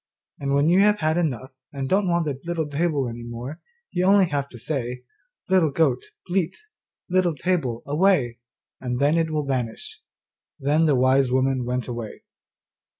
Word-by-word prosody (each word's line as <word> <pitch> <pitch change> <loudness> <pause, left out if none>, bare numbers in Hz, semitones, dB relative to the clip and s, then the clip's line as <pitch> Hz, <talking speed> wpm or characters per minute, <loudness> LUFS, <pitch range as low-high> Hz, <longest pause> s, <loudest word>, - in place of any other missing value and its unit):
And 140 0 0
when 140 +2 +3
you 175 +3 +5
have 210 +1 +5
had 155 -2 +1
enough 130 -7 -2 0.2
and 135 -2 -4
don't 195 +5 +2
want 170 -1 +1
the 140 -3 -3
little 170 -2 -2
table 145 -2 0
any 120 0 -6
more, 120 +6 -7 0.3
you 180 - 0
have 195 - +6
only 195 -2 +5
to 140 -6 -3
say, 125 -1 -4 0.4
"Little 185 -4 +4
goat, 140 -3 +1 0.2
bleat, 180 -2 -1 0.5
Little 180 -3 +2
table, 140 -7 -1
away," 145 -6 +2 0.4
and 125 -1 -3
then 145 +3 +3
it 165 -1 +1
will 155 -2 -1
vanish.' 125 -5 -4 0.6
Then 150 +4 +2
the 145 - +4
wise 130 0 +3
woman 130 -1 +1
went 125 0 -2
away. 120 -3 -6
140 Hz, 165 wpm, -24 LUFS, 125-170 Hz, 0.6 s, have